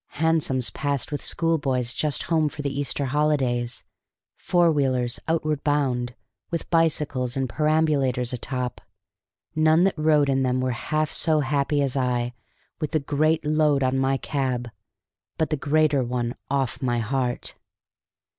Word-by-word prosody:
Hansoms 155 -5 +1
passed 140 -2 -2
with 145 - -3
schoolboys 135 -7 0
just 150 +1 0
home 160 -2 +1
for 145 - -7
the 140 -1 -2
Easter 140 0 -1
holidays, 130 -4 0 0.5
four 175 -2 +2
wheelers 130 -5 0
outward 155 -3 0
bound, 125 -5 0 0.3
with 170 - -3
bicycles 150 -6 +1
and 135 -1 0
perambulators 140 -3 +1
atop; 125 +1 -4 0.7
none 155 +2 +4
that 195 - +3
rode 150 -2 +3
in 135 -1 +1
them 130 -1 +1
were 130 0 0
half 155 +5 -1
so 155 -2 +2
happy 145 +1 +1
as 135 -1 -1
I, 125 -2 0 0.5
with 155 -1 -3
the 155 - +3
great 155 +2 +1
load 150 -2 +2
on 130 +1 +1
my 135 0 +2
cab, 130 -5 -2 0.7
but 160 0 0
the - - +2
greater 150 -1 +2
one 120 -1 -2 0.2
off 135 -2 -1
my 120 -2 0
heart. 125 +1 -1
140 Hz, 145 wpm, -24 LUFS, 125-155 Hz, 0.7 s, none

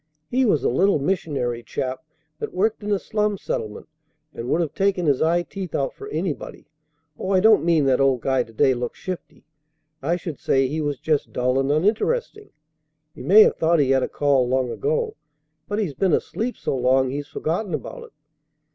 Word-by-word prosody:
He 260 +1 +2
was 180 - +2
a - - +2
little 190 +10 +3
missionary 140 -7 -1
chap 130 +3 -4 0.4
that - - -5
worked 215 +4 +1
in 210 0 -3
a 200 - +3
slum 210 +1 -1
settlement 105 - -5 0.5
and 120 +2 -6
would 165 - +2
have 160 -4 -1
taken 195 -2 +1
his 140 -4 +2
eye 170 +2 +2
teeth 185 -1 -6
out 135 - -1
for - - -10
anybody. 160 -1 -4 0.5
Oh, 190 - -4
I 190 -1 +4
don't 215 +2 +5
mean 165 -4 +3
that 135 0 +3
old 135 -3 +2
guy 130 +1 +1
to 115 - -7
day 130 +4 +3
looked 120 -1 -4
shifty. 185 -2 -7 0.6
I 160 +5 0
should 165 -3 -6
say 135 0 +2
he 155 +4 -2
was 145 -3 -2
just 155 -3 0
dull 125 +1 +1
and 135 +1 +1
uninteresting. 325 - 0 0.6
He - - -11
may 215 +4 +7
have - - +2
thought 165 +1 +3
he 140 -3 +2
had 135 -1 +3
a - - -1
call 140 -3 +2
long 130 -1 0
ago, 455 0 -1 0.5
but 205 - -2
he's 200 -9 -1
been 180 +5 +1
asleep 240 +3 -1
so - - -2
long 130 +1 +2
he's 145 +1 -4
forgotten 170 +5 -2
about - - -7
it." - - -17
155 Hz, 200 wpm, -23 LUFS, 135-195 Hz, 0.6 s, may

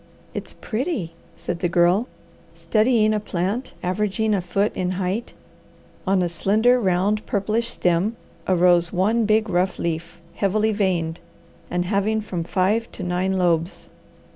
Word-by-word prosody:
"It's - - -6
pretty!" 220 - -3 0.2
said 170 +1 -4
the 175 - 0
Girl, 175 +7 +3 0.5
studying 215 -1 +2
a 215 - +1
plant 205 +5 -3
averaging 210 +4 0
a 195 - +1
foot 195 +4 0
in 185 0 -1
height. 190 +5 -3 0.7
On 190 -1 +3
a - - +1
slender, 215 +8 +3
round, 200 +1 +1
purplish 215 +3 0
stem 185 0 +1 0.3
arose 175 -2 +4
one 215 +5 +2
big, 215 +1 +2
rough 185 -1 0
leaf, 170 +1 -4
heavily 215 +2 +1
veined, 180 -5 0 0.5
and 175 0 -1
having 205 +3 +1
from 185 -5 -4
five 200 +7 0
to 185 - -5
nine 180 +2 0
lobes. 170 -1 0
190 Hz, 140 wpm, -23 LUFS, 175-215 Hz, 0.7 s, arose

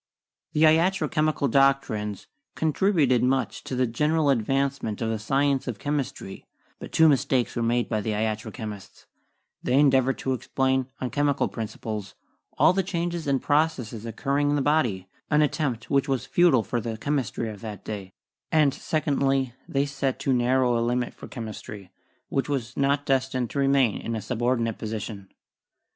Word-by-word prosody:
The 155 - +3
iatro 160 +1 +3
chemical 155 -2 +1
doctrines 115 -6 +1 0.3
contributed 155 - +2
much 125 -4 0
to 130 - -4
the 130 0 +2
general 150 +5 +1
advancement 135 -2 0
of 115 -1 -1
the 110 - -2
science 135 +4 +1
of 125 - -3
chemistry, 140 -9 -4 0.4
but - - -9
two 160 - +5
mistakes 130 -3 +2
were 120 - -1
made 120 +1 +1
by 110 -2 -1
the 110 +1 -2
iatro 110 +1 -2
chemists: 105 -5 -8 0.6
they 125 - -1
endeav 135 -2 +5
ored 135 - 0
to 130 - -1
explain, 130 0 0
on 125 - -3
chemical 145 -1 +1
principles, 110 -2 -6 0.4
all - - +5
the 195 - +2
changes 170 -3 -3
and 135 -2 +1
processes 145 -8 0
occurring 140 +5 -1
in 145 - +2
the 145 - +1
body 120 -12 +1
— - - -44
an 150 0 +4
attempt 140 -6 -2
which 140 0 +2
was 130 -3 -1
futile 165 -10 +4
for 120 +2 -2
the 115 0 -4
chemistry 130 -3 -2
of 105 -2 -8
that 105 -4 -8
day; 100 -3 -6 0.4
and, 150 -4 +4
secondly, 135 -5 0
they 140 0 +1
set 140 -2 -2
too 135 0 0
narrow 125 -1 +2
a - - 0
limit 120 +1 -1
for - - -11
chemistry, 105 -4 -8 0.4
which 135 +1 -1
was 130 -4 -2
not 140 +1 +1
destined 130 -2 0
to 140 - -2
remain 135 -5 +2
in 115 - -3
a 110 - -3
subordinate 115 0 -1
position. 105 -3 -5
130 Hz, 170 wpm, -25 LUFS, 115-145 Hz, 0.6 s, two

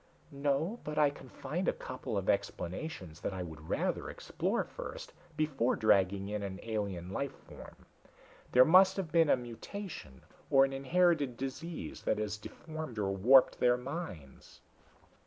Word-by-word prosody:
"No 145 +10 0
but 150 0 -5
I 150 -2 +5
can 130 - -13
find 155 +10 -4
a - - +3
couple 130 -4 -5
of 95 - -2
explanations 95 - -2
that 95 - -3
I 90 - -3
would 80 -2 -10
rather - - -1
explore - - -2
first, - - -8 0.2
before 135 -6 +1
dragging 100 -3 +3
in 105 0 -3
an 95 -1 -5
alien 100 -6 -3
life 140 +7 -3
form. - - -13 0.7
There 125 +1 +7
may 185 +4 +9
have 185 -5 -3
been 165 -1 +4
a - - +5
mutation 120 - -8 0.3
or 135 0 +6
an 135 - -4
inherited 145 -2 +2
disease 135 - -5
that - - 0
has 105 -1 -2
deformed 155 +3 -8
or 100 -2 0
warped 125 +7 +6
their 125 0 +4
minds." 125 - -8
130 Hz, 155 wpm, -32 LUFS, 100-155 Hz, 0.7 s, may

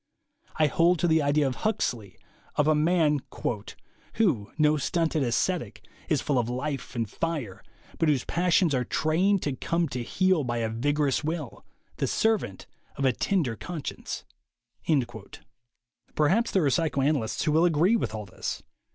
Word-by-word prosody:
I 155 - +3
hold 170 +4 +3
to 175 - +1
the 160 -1 +3
ideal 145 0 +2
of 130 - -3
Huxley, 120 - -2 0.4
of 150 - +2
a 155 - +5
man 155 -1 +3 1.0
"who, 145 - +1
no 150 0 +4
stunted 160 +2 0
ascetic, 155 +8 -1 0.2
is 150 -5 +2
full 140 -4 +1
of 120 -1 -1
life 130 -1 -4
and 115 -2 -1
fire, 145 - -4 0.4
but 165 - +3
whose 140 -5 +1
passions 175 -1 +2
are 125 -1 +1
trained 170 +9 +1
to 145 -3 -1
come 170 +5 0
to 125 -1 -4
heel 185 +5 +1
by 120 -2 -2
a 115 -1 -1
vigorous 145 +5 0
will, 155 -5 -4 0.3
the - - 0
servant 215 - 0 0.3
of 140 - -1
a 130 - +4
tender 150 - 0
conscience." 165 +5 -6 1.9
Perhaps 190 +11 +2
there 190 -5 +2
are 140 - +3
psychoanalysts 140 -6 0
who 155 - +1
will 160 +3 +4
agree 175 +6 +3
with 205 - -1
all 105 -1 -5
this. 90 - -5
150 Hz, 155 wpm, -27 LUFS, 130-170 Hz, 1.9 s, a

